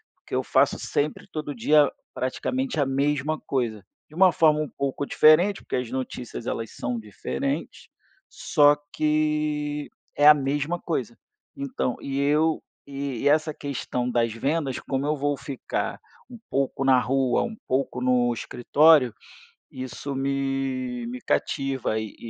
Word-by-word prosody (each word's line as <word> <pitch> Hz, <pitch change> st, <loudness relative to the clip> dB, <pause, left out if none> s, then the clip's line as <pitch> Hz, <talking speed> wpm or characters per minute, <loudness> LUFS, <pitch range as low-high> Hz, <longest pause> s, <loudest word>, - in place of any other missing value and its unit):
Porque -, -, -15 dB
eu -, -, +1 dB
faço -, -, +2 dB
sempre 150 Hz, +1 st, -2 dB
todo 150 Hz, -2 st, -4 dB
dia 145 Hz, +4 st, +4 dB, 0.2 s
praticamente 250 Hz, -, -2 dB
a 145 Hz, -, +3 dB
mesma 145 Hz, +3 st, 0 dB
coisa 120 Hz, -8 st, -2 dB, 0.3 s
de 155 Hz, -, -15 dB
uma 185 Hz, +1 st, +6 dB
forma 155 Hz, -1 st, +3 dB
um 150 Hz, -, -3 dB
pouco 140 Hz, +1 st, -3 dB
diferente, 175 Hz, +8 st, +5 dB
porque -, -, -4 dB
as 125 Hz, -2 st, -3 dB
notícias 125 Hz, -2 st, -5 dB
elas 115 Hz, -1 st, -3 dB
são 120 Hz, 0 st, -3 dB
diferentes, 100 Hz, -, -4 dB, 0.4 s
só 145 Hz, 0 st, +4 dB, 0.2 s
que 150 Hz, -1 st, 0 dB, 0.3 s
é 145 Hz, -, +3 dB
a 150 Hz, -, +11 dB
mesma 145 Hz, +4 st, -1 dB
coisa, -, -, -3 dB, 0.4 s
então 275 Hz, -, -2 dB
e 135 Hz, 0 st, -3 dB
eu 155 Hz, +3 st, +2 dB, 0.2 s
e 140 Hz, -3 st, -4 dB
e -, -, +3 dB
essa 155 Hz, +1 st, +2 dB
questão 125 Hz, -3 st, -3 dB
das 120 Hz, -2 st, +1 dB
vendas, 135 Hz, +3 st, -1 dB
como 135 Hz, 0 st, -2 dB
eu 150 Hz, +1 st, +1 dB
vou 145 Hz, +1 st, 0 dB
ficar 140 Hz, -1 st, -4 dB, 0.3 s
um 240 Hz, -2 st, -11 dB
pouco 135 Hz, 0 st, -1 dB
na 130 Hz, -1 st, +6 dB
rua, 130 Hz, 0 st, +1 dB
um 225 Hz, -, -5 dB
pouco 130 Hz, -1 st, -1 dB
no 125 Hz, -1 st, +3 dB
escritório, 130 Hz, +2 st, +4 dB, 0.6 s
isso 135 Hz, +1 st, -6 dB
me 135 Hz, -2 st, -2 dB
me 125 Hz, +1 st, -6 dB
cativa 135 Hz, -6 st, -1 dB
e 110 Hz, -1 st, -6 dB
140 Hz, 145 wpm, -25 LUFS, 125-150 Hz, 0.6 s, a